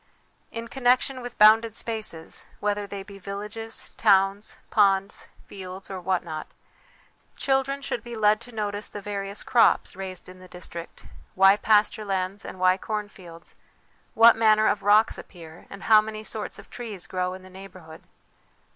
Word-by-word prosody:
In 230 0 -6
connection 255 +1 +1
with 245 0 -8
bounded 220 +1 +6
spaces, 215 -8 -5
whether 205 0 -1
they 200 -1 -6
be 200 0 -12
villages, 210 +3 -6
towns, 195 -1 +2
ponds, 195 -1 +2 0.2
fields, 190 0 -9
or 190 -1 -5
what 185 0 0
not, 155 -2 -6 0.9
children 275 +1 0
should 235 - -3
be 240 -1 -7
led 215 0 +3
to 245 - -11
notice 210 -2 -3
the 205 - -7
various 200 0 -5
crops 235 -6 +3
raised 185 -1 -7
in 185 0 -13
the 185 - -13
district, 175 -1 -9 0.3
why 195 +1 +7
pasture 210 +1 +2
lands 195 0 -2
and 185 - -9
why 185 0 +4
cornfields, 195 -6 -7 0.6
what 230 +1 +8
manner 215 -1 +4
of 205 - +1
rocks 210 +2 +4
appear, 165 -2 -13
and 200 0 -10
how 215 -1 +7
many 215 0 -7
sorts 215 -1 -5
of - - -14
trees 215 -7 -7
grow 180 0 -2
in 185 - -12
the - - -13
neighbourhood. 185 -4 -12
205 Hz, 155 wpm, -25 LUFS, 185-220 Hz, 0.9 s, what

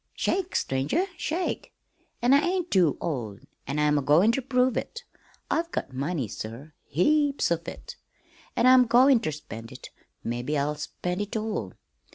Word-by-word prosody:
"Shake, 380 -1 -1
stranger, 135 - 0
shake! 345 +4 -3 0.5
An' 245 +2 +5
I 280 - +7
ain't 360 +2 -1
too 175 -7 +3
old, 120 - -4 0.3
an' 140 +3 -2
I'm 150 0 +3
agoin' 155 +10 +4
ter 270 - -1
prove 255 -1 +1
it. 470 0 -4 0.5
I've 335 +1 0
got 130 - -4
money, 140 0 -2
sir, 115 +9 -8
heaps 285 - +2
of 170 0 -1
it, - - -8 0.6
an' - - +2
I'm 255 -1 +7
goin' 250 +2 +6
ter 155 - -2
spend 115 -6 -8
it - - -11 0.3
mebbe 120 +6 -2
I'll 145 +1 0
spend 180 +5 -4
it 205 +2 -3
all. 215 - -3
180 Hz, 160 wpm, -26 LUFS, -, 0.6 s, I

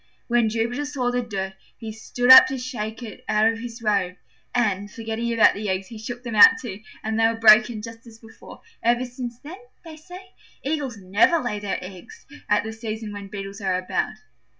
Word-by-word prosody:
When 235 -2 +2
Jupiter 235 +5 -2
saw 260 -4 -2
the 245 0 0
dirt, 195 -5 -5 0.2
he 225 -2 -7
stood 245 +3 +1
up 260 - +11
to 265 - -4
shake 240 -2 -5
it 220 -3 -10
out 215 +1 +3
of 225 0 +1
his 235 0 -8
robe, 195 -4 0 0.4
and, 205 -4 0
forgetting 225 +1 -4
about 230 -1 +5
the 205 0 -4
eggs, 190 +1 -2
he 225 -2 -9
shook 240 +2 -7
them 235 -2 -6
out 210 - +9
too, 210 -6 -7 0.2
and 220 0 -2
they 225 - +5
were 230 - -1
broken 220 0 +5
just 230 +1 -10
as 225 -1 -14
before. 225 -1 -15 0.2
Ever 240 +2 +1
since 245 -1 -7
then, 335 +7 -10 0.3
they 315 -2 -10
say, 365 +4 -13 0.3
Eagles 275 -5 -3
never 200 - +2
lay 245 -8 -3
their 205 -1 -3
eggs 185 -1 -12 0.2
at 210 - +3
the 220 0 -6
season 220 -1 -6
when 200 -1 -8
Beetles 195 0 -8
are 190 -2 0
about. 185 - -2
225 Hz, 200 wpm, -23 LUFS, 210-245 Hz, 0.4 s, up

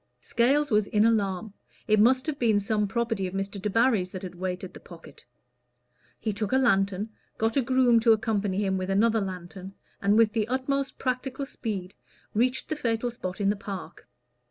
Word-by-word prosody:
Scales 275 +5 +2
was 210 -1 +3
in 210 +1 +3
alarm; 205 -2 0 0.3
it 215 -1 +4
must 255 +4 +4
have 305 -3 -3
been 220 -4 +3
some 210 +1 0
property 225 -2 -1
of 180 - -7
Mr. 195 0 -3
Debarry's 210 -2 +2
that 185 0 -8
had 180 - -6
weighted 180 0 -5
the - - -11
pocket. 170 -2 -14 0.9
He 215 - -2
took 205 0 -3
a 260 - +4
lantern, 200 -4 +2 0.3
got 225 +1 0
a 275 - +4
groom 250 -2 +4
to 230 0 +4
accompany 210 -2 +1
him 190 -1 0
with 185 0 -4
another 220 +3 +3
lantern, 185 0 -7 0.3
and 200 +2 +3
with 225 -2 +4
the 220 -2 0
utmost 265 +2 -1
practical 260 +1 -2
speed 195 -8 -5 0.4
reached 250 +4 +1
the 310 - -1
fatal 240 -3 -1
spot 185 -5 -6
in 200 0 +2
the - - -1
park. 195 -2 -8
215 Hz, 180 wpm, -27 LUFS, 195-240 Hz, 0.9 s, it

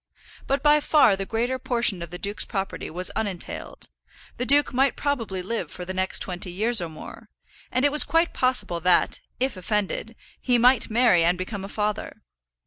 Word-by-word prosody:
But 275 +1 0
by 300 0 +5
far 290 -8 +4
the 195 0 -5
greater 240 +3 -1
portion 235 -7 -1
of 170 - -6
the 175 - -7
duke's 200 +3 -2
property 195 -3 -4
was 180 +3 -1
unentailed; 200 -5 -5 0.5
the 250 - -3
duke 285 0 +4
might 270 +2 +2
probably 230 -10 -3
live 190 -4 -4
for 180 +3 -8
the 185 - -5
next 185 0 +1
twenty 180 -1 -4
years 220 +4 +1
or 170 - -4
more; 155 - -11 0.4
and 255 +2 +2
it 285 - +3
was 300 - +6
quite 330 +1 +1
possible 230 -9 +1
that, 175 +1 +2 0.2
if 260 -1 -1
offended, 210 +3 -2 0.3
he 245 -2 +2
might 245 +1 +3
marry 220 -7 +4
and 175 +2 +3
become 190 +2 -5
a 195 - -7
father. 210 0 -4
210 Hz, 185 wpm, -24 LUFS, 185-255 Hz, 0.5 s, was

